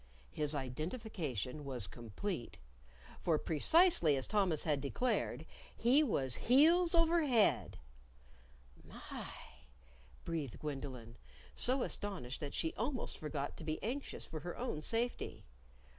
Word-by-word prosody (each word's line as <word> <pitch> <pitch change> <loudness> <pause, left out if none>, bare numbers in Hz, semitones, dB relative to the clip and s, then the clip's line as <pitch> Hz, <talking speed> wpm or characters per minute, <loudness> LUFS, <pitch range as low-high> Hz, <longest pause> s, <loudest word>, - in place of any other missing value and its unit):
His 150 0 +1
identification 150 - -4
was 130 -6 0
complete. 120 - -5 0.6
For 165 -3 +2
precisely 165 - +4
as 130 - -1
Thomas 190 -8 +2
had 150 -3 0
declared, 240 - -1 0.3
he 250 +6 +5
was 135 - +1
heels 330 +7 +6
over 335 0 +4
head. 235 -5 +2 1.1
"My!" - - -8 1.0
breathed 160 -7 -3
Gwendolyn, 135 -6 -6 0.4
so 255 +1 +2
astonished 180 -11 -3
that 145 -2 -5
she 160 - 0
almost 250 +3 -3
forgot 145 -2 -4
to - - -8
be 155 0 -2
anxious 265 +6 -4
for 160 - -6
her 175 +3 -6
own 235 -11 -3
safety. 235 +8 -2
160 Hz, 115 wpm, -35 LUFS, -, 1.1 s, heels